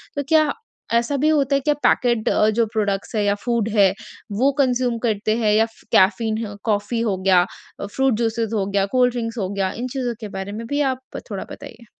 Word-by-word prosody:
तो 285 - -1
क्या 310 -2 +4 0.4
ऐसा 235 +5 +2
भी 305 +3 +2
होता 280 -2 +2
है - - +3
कि 295 - +4
पैकेट 240 -3 +2
अ, 215 - +3
जो 225 +1 +2
प्रोडक्ट्स 205 0 -1
है 210 - +1
या 200 0 +2
फूड 235 -3 0
है 195 -2 +5 0.5
वो 275 +2 +5
कंज्यूम 250 -3 +1
करते 215 0 0
हैं 215 -3 +2
या 220 +1 +4 0.3
कैफ़ीन 220 +3 +3 0.2
कॉफ़ी 215 +2 0
हो 205 -5 0
गया, 185 -1 +4 0.4
फ्रूट 265 +5 +1
जूसेस 225 -1 -1
हो 200 -3 0
गया, 200 0 +1
कोल्ड 250 +3 +2
ड्रिंक्स 230 -1 -4
हो 190 -3 -2
गया, 195 -2 -1
इन 250 +2 -4
चीज़ों 250 -3 -2
के 215 - -5
बारे 190 +1 -5
में 230 - -6
भी 285 +2 0
आप 260 0 -10
थोड़ा 195 - -3
बताइए। 235 +1 -11
225 Hz, 205 wpm, -21 LUFS, 205-250 Hz, 0.5 s, है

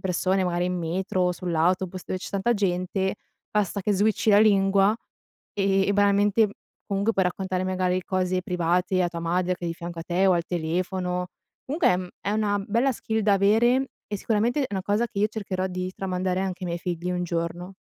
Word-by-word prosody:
persone, 190 +1 +1
magari 175 0 0
in 180 0 -1
metro, 180 +2 0
sull'autobus, 180 +1 0
dove 185 - -2
c'è - - -7
tanta 200 +4 +1
gente, 190 -1 0 0.4
basta 200 -1 +1
che 210 - 0
switchi 210 +2 +1
la 205 - +7
lingua, 200 -1 +4 0.6
e 195 -1 +2
e - - +3
banalmente, 205 +2 +4
m - - -9 0.4
comunque, 200 +3 0
puoi 195 -3 +2
raccontare, 185 0 -2
magari, 185 0 0
cose 185 -1 0
private, 180 +1 0
a 175 - +1
tua 170 -1 -6
madre, 180 +2 0
che 175 - -8
è - - -1
di - - -2
fianco 170 0 -7
a - - -4
te, 180 +3 +1
o 190 - +5
al 170 -1 +1
telefono. 180 +2 -2 0.4
Comunque, 310 +5 +3
ehm, 180 0 -2
è 200 - -2
una 205 -2 0
bella 235 +6 +2
skill 220 -1 -2
da 210 -1 +3
avere, 235 +7 +3 0.2
e 205 - -3
sicuramente, 230 +7 +1
è - - 0
una 195 -2 -2
cosa 205 +5 +1
che 205 - -7
io 210 - +4
cercherò 195 -4 -3
di 185 0 -3
tramandare, 185 -1 -1
anche 190 -1 -3
i - - -3
miei 170 0 -2
figli, 175 0 -3
un 180 0 -1
giorno. 175 +2 -3
185 Hz, 200 wpm, -25 LUFS, 180-205 Hz, 0.6 s, la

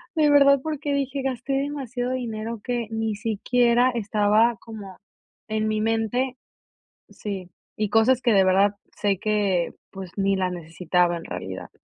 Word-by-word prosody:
de 305 -2 +4
verdad 280 -1 +6
porque 300 -2 -2
dije: 275 0 -1
"Gasté 260 +1 -2
demasiado 270 -3 -2
dinero 230 -2 -4
que 240 -3 -2
ni 225 -1 -1
siquiera 240 +3 +2
estaba 215 +1 +2
como 205 -5 -10 0.5
en 215 0 0
mi 215 0 0
mente". 225 +4 0 0.7
Sí. 190 -4 -6 0.3
Y 210 -2 0
cosas 230 +4 +4
que 235 - +3
de 195 -1 +5
verdad 195 +2 +3 0.2
sé 200 -2 +1
que, 205 -5 +1 0.2
pues, 190 -3 -8
ni 195 0 +2
la 185 -1 0
necesitaba, 175 +1 0
en 165 - -9
realidad. 95 +1 -6
220 Hz, 145 wpm, -24 LUFS, 195-250 Hz, 0.7 s, verdad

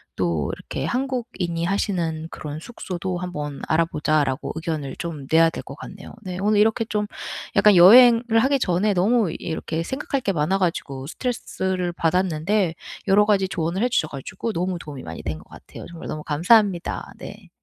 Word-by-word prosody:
또 85 -5 -1
이렇게 - - -6
"한국인이 240 -10 -2
하시는 170 -4 -1
그런 150 0 -6
숙소도 185 -2 -5
한번 150 -6 -5
알아 165 +1 +3
보자."라고 150 -3 0
의견을 160 -4 -4
좀 155 -6 -6
내야 165 +1 +6
될 - - -6
것 135 - -9
같네요. 190 +5 -10
네. 180 -2 -5
오늘 210 +1 +3
이렇게 220 +1 +3
좀 210 -1 -1 0.5
약간 210 -2 +6
여행을 230 +6 +8 0.2
하기 270 +4 +3
전에 200 0 +1
너무 200 +1 +2
이렇게 160 0 -3
생각할 265 +5 -3
게 200 - 0
많아 160 +4 +1
가지고 150 -7 -2
스트레스를 190 - -3
받았는데, 175 +2 +1 0.3
여러 205 +2 +5
가지 200 -2 +2
조언을 175 +3 -1
해 250 - +2
주셔 195 -10 +1
가지고 145 - -5
너무 180 0 -2
도움이 145 -5 -9
많이 80 0 -7
된 80 - -3
것 - - -18
같아요. - - -11
정말 170 -1 -9
너무 155 - -5
감사합니다. 180 +4 +2
네. - - -10
180 Hz, 370 characters per minute, -23 LUFS, 160-210 Hz, 0.5 s, 여행을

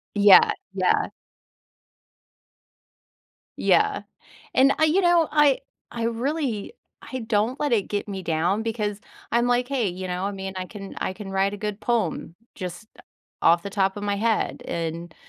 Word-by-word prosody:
Yeah, 205 -1 +7 0.2
yeah. - - +2 2.5
Yeah, - - +2 0.5
and, 270 +2 +5
I 315 - +4
you 315 +5 +3
know, 345 -3 +4
I 295 -3 +4 0.3
I 235 -1 -4
really 240 - -2 0.3
I 260 - -6
don't 225 +3 0
let 295 -3 0
it 210 -4 +1
get 205 0 -3
me 195 -2 -5
down 175 +6 0
because 215 -3 -3 0.3
I'm 235 +1 +3
like, 245 +1 +1
"Hey." 255 -7 0
You 185 +1 -5
know? 180 +1 -2
I 200 - -1
mean, 190 -1 -6
"I 185 - -4
can 195 -1 -9
I - - -2
can 195 0 -8
write 195 +1 +1
a - - -5
good 210 0 -4
poem 215 -8 -1 0.2
just, 185 +2 -7
uh, - - -14 0.4
off 170 0 +5
the 200 - -6
top 195 -1 0
of 205 - -6
my 205 -1 0
head? 220 +1 0
And" 165 0 -4
210 Hz, 165 wpm, -24 LUFS, 190-240 Hz, 2.5 s, Yeah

